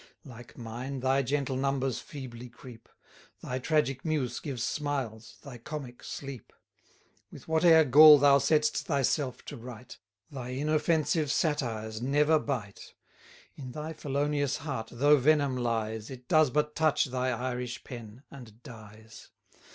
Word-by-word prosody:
Like 120 Hz, -3 st, -13 dB
mine, 125 Hz, +3 st, -6 dB
thy 135 Hz, +1 st, +2 dB
gentle 135 Hz, 0 st, -1 dB
numbers 135 Hz, -1 st, -1 dB
feebly 125 Hz, -4 st, -9 dB
creep; 120 Hz, -1 st, -14 dB, 0.5 s
Thy 130 Hz, +1 st, -3 dB
tragic 135 Hz, -2 st, 0 dB
muse 145 Hz, -7 st, -2 dB
gives 130 Hz, -6 st, -5 dB
smiles, 130 Hz, -6 st, -4 dB
thy 130 Hz, -4 st, -10 dB
comic 130 Hz, -1 st, -8 dB
sleep. 135 Hz, -4 st, -8 dB, 0.8 s
With -, -, -12 dB
whate'er 160 Hz, 0 st, +5 dB
gall 150 Hz, +2 st, +9 dB
thou 140 Hz, 0 st, +5 dB
sett'st 150 Hz, +3 st, +2 dB
thyself 140 Hz, -2 st, -1 dB
to 145 Hz, -, -8 dB
write, 120 Hz, 0 st, -11 dB, 0.3 s
Thy 125 Hz, -2 st, -6 dB
inoffensive 155 Hz, 0 st, +1 dB
satires 115 Hz, -9 st, -2 dB
never 150 Hz, +4 st, +3 dB
bite. 115 Hz, -10 st, -6 dB, 0.6 s
200 140 Hz, -, -9 dB
In 130 Hz, -, -7 dB
thy 155 Hz, +1 st, -5 dB
felonious 145 Hz, -1 st, -1 dB
heart 130 Hz, -7 st, -5 dB
though 145 Hz, +5 st, +4 dB
venom 140 Hz, -1 st, +2 dB
lies, 110 Hz, -3 st, -2 dB
It 130 Hz, -2 st, -11 dB
does 155 Hz, -2 st, +4 dB
but 150 Hz, +3 st, 0 dB
touch 160 Hz, -2 st, +2 dB
thy 130 Hz, -1 st, -2 dB
Irish 125 Hz, 0 st, -4 dB
pen, 120 Hz, 0 st, -10 dB
and 120 Hz, -4 st, -13 dB
dies. 110 Hz, -3 st, -13 dB
135 Hz, 135 wpm, -29 LUFS, 120-150 Hz, 0.8 s, gall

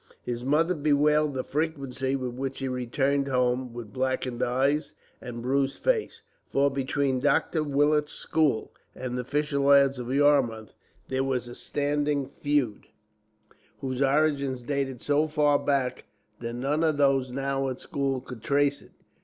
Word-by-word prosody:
His 120 Hz, 0 st, -4 dB
mother 155 Hz, +6 st, +2 dB
bewailed 150 Hz, -1 st, +2 dB
the 130 Hz, -, -1 dB
frequency 140 Hz, -3 st, -2 dB
with 130 Hz, -2 st, -3 dB
which 135 Hz, +1 st, -4 dB
he 135 Hz, -, -3 dB
returned 135 Hz, +3 st, 0 dB
home 125 Hz, -1 st, 0 dB
with 115 Hz, -3 st, -9 dB
blackened 130 Hz, -2 st, -1 dB
eyes 135 Hz, +5 st, +1 dB, 0.3 s
and 120 Hz, -1 st, -7 dB
bruised 135 Hz, +1 st, 0 dB
face; -, -, -1 dB, 0.2 s
for 140 Hz, +1 st, +2 dB
between 135 Hz, 0 st, 0 dB
Dr. 150 Hz, +3 st, +2 dB
Willet's 150 Hz, +1 st, +2 dB
school 150 Hz, -8 st, 0 dB, 0.2 s
and 125 Hz, -1 st, -4 dB
the 125 Hz, -, -2 dB
fisher 145 Hz, +2 st, -1 dB
lads 140 Hz, -1 st, +5 dB
of 125 Hz, 0 st, -5 dB
Yarmouth 135 Hz, -6 st, +2 dB, 0.4 s
there 130 Hz, 0 st, 0 dB
was 130 Hz, -2 st, -1 dB
a 120 Hz, -, -8 dB
standing 145 Hz, +1 st, -1 dB
feud, 145 Hz, -7 st, -1 dB, 0.9 s
whose 130 Hz, -1 st, -3 dB
origin 140 Hz, -1 st, +2 dB
dated 135 Hz, -3 st, -2 dB
so 145 Hz, +2 st, +2 dB
far 150 Hz, -2 st, +3 dB
back 135 Hz, -3 st, -1 dB, 0.3 s
that 115 Hz, 0 st, -5 dB
none 140 Hz, +6 st, 0 dB
of 155 Hz, -2 st, +2 dB
those 135 Hz, -3 st, +2 dB
now 135 Hz, 0 st, -1 dB
at 130 Hz, -, -5 dB
school 135 Hz, -2 st, -2 dB
could 125 Hz, -3 st, -10 dB
trace 140 Hz, +1 st, +1 dB
it. -, -, -18 dB
135 Hz, 150 wpm, -27 LUFS, 130-145 Hz, 0.9 s, lads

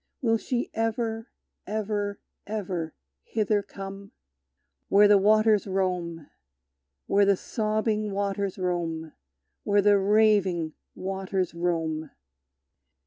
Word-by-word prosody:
Will 225 Hz, -3 st, +2 dB
she 245 Hz, +1 st, -2 dB
ever, 225 Hz, 0 st, -1 dB, 0.4 s
ever, 205 Hz, -1 st, -2 dB, 0.3 s
ever 185 Hz, -6 st, -3 dB, 0.3 s
hither 210 Hz, -, 0 dB
come? 195 Hz, 0 st, -9 dB, 0.8 s
Where 205 Hz, +1 st, +7 dB
the 205 Hz, -1 st, +6 dB
waters 215 Hz, +1 st, +4 dB
roam, 180 Hz, -4 st, -2 dB, 0.8 s
Where 200 Hz, +1 st, +3 dB
the 200 Hz, -1 st, +4 dB
sobbing 215 Hz, 0 st, -1 dB
waters 200 Hz, 0 st, -2 dB
roam! 170 Hz, -3 st, -2 dB, 0.5 s
Where 205 Hz, -1 st, +3 dB
the 205 Hz, 0 st, +5 dB
raving 195 Hz, -5 st, +3 dB, 0.2 s
waters 190 Hz, -1 st, -2 dB
roam! 165 Hz, -3 st, -1 dB
200 Hz, 95 wpm, -27 LUFS, 180-215 Hz, 0.8 s, Where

